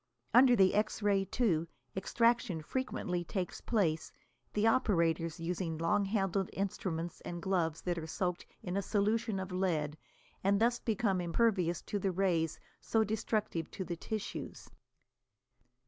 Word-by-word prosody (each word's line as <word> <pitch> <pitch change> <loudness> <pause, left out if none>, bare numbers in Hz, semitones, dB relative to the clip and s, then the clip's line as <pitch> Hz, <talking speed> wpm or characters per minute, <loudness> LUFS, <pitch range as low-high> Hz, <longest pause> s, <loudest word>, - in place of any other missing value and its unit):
Under 250 0 +7
the 190 -4 +5
X 210 +1 0
ray, 200 -2 +3
too, 175 -7 +1 0.3
extraction 230 -4 +1
frequently 180 -6 -2
takes 180 +1 -4
place, 165 -9 0 0.4
the 210 +1 +2
operators 170 -8 +2
using 165 -1 -2
long 200 +5 +2
handled 195 -2 0
instruments 175 -4 -3
and 175 - -5
gloves 170 -4 0
that 175 -2 -1
are 160 - -6
soaked 180 +1 -2 0.2
in 180 0 -3
a 200 - +1
solution 215 +1 0
of 190 0 -5
lead 160 -5 -1 0.4
and 200 +1 +3
thus 240 +2 +3
become 205 -4 0
impervious 175 -2 +1
to 205 - -2
the 195 0 0
rays 175 -4 +1 0.2
so 225 -1 +2
destructive 215 -5 -1
to 190 - -5
the 175 - -3
tissues. 215 +5 -5
190 Hz, 140 wpm, -33 LUFS, 170-215 Hz, 0.4 s, Under